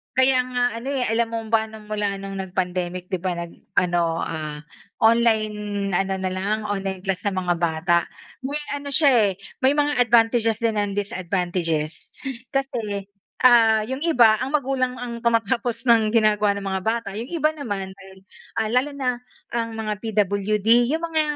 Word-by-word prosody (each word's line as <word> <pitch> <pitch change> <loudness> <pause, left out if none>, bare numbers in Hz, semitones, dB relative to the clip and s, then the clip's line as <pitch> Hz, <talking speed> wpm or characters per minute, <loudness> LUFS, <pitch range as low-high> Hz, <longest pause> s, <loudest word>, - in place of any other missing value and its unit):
Kaya 260 0 +4
nga 250 -1 -1 0.2
ano, 250 - -8
eh, 255 - 0
alam 230 +1 +1
mo 230 0 -2
ba, 220 -1 +3
nung 215 -1 -12
mula 205 -2 -1
nung 195 0 -6
nagpandemic, 180 -1 -3
'di 185 - 0
ba, 180 0 -2
nag 170 0 -5 0.2
ano, 170 -2 +1
ah, 155 -2 -5 0.4
online 215 -3 +2
ano 195 +1 +1
na 185 0 -2
lang, 200 +4 -1
online 195 -2 -3
class 195 -1 -2
na 195 - -1
mga 180 -1 0
bata. 170 +1 +2 0.4
May 280 +3 -3
ano 285 0 -4
siya, 280 0 +4 0.2
eh, - - -1 0.3
may 265 +2 +4
mga 295 -3 +1
advantages 230 -1 +3
din 225 -2 0
and 205 -1 -1
disadvantages. 175 -5 -2 0.4
Kasi, 230 -8 -2 0.4
ah, 225 -3 +6
yung 260 +3 -4
iba, 240 -10 +4
ang 260 - -1
magulang 255 -2 -1
ang 235 -1 -6
tumatapos 235 +1 0
ng 225 -3 +5
ginagawa 210 -2 +3
ng 200 - -6
mga 190 -1 -1
bata. 225 +1 -1
Yung 225 +5 -5
iba 310 -2 +1
naman, 205 -10 -5
dahil, 190 0 -15 0.4
ah, 220 -1 0
lalo 255 +4 +2
na, 250 -2 -1 0.3
ang 230 -1 -2
mga 215 -1 -2
PWD, 215 +2 +2
yung 320 +2 -1
mga 320 -1 +1
215 Hz, 170 wpm, -23 LUFS, 190-240 Hz, 0.4 s, ah